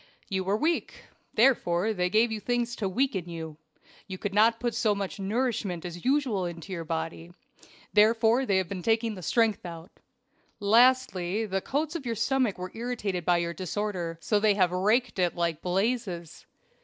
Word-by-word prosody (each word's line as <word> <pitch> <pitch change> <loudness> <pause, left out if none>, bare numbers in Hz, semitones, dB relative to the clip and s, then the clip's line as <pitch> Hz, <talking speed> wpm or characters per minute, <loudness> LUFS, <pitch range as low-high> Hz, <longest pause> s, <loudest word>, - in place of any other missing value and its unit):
"You 190 -2 -1
were 195 +3 +1
weak 320 +6 -1 0.3
therefore 220 -5 +3
they 180 -2 0
gave 220 +4 +3
you 220 - -2
things 240 +2 -1
to 195 - -1
weaken 195 -5 -1
you. 160 -2 -7 0.5
You 190 -2 -6
could 200 +1 -4
not 225 +2 +4
put 240 -1 -1
so 220 -3 +1
much 200 0 -4
nourishment 205 -4 -1
as 175 0 -7
usual 255 -8 +1
into 170 +2 -7
your 170 -2 -4
body 165 +1 -4 0.6
therefore 225 +3 +4
they 195 - +3
have 190 -2 0
been 185 0 -5
taking 225 -1 0
strength 225 +3 +1
out. 170 -1 -9 0.7
Lastly, 220 -3 +3
the 195 -2 -2
coats 305 - -2
of 280 -7 -4
your 230 - -1
stomach 235 -1 +1
were 185 0 -6
irritated 225 -7 -3
by 175 -1 +4
your 170 0 -2
disorder 185 -2 -3
so 210 +3 +1
they 210 -1 +3
have 185 -3 +3
raked 210 +5 +1
it 175 -1 +1
like 170 -2 -1
blazes. 190 -3 -2
205 Hz, 170 wpm, -28 LUFS, 180-230 Hz, 0.7 s, not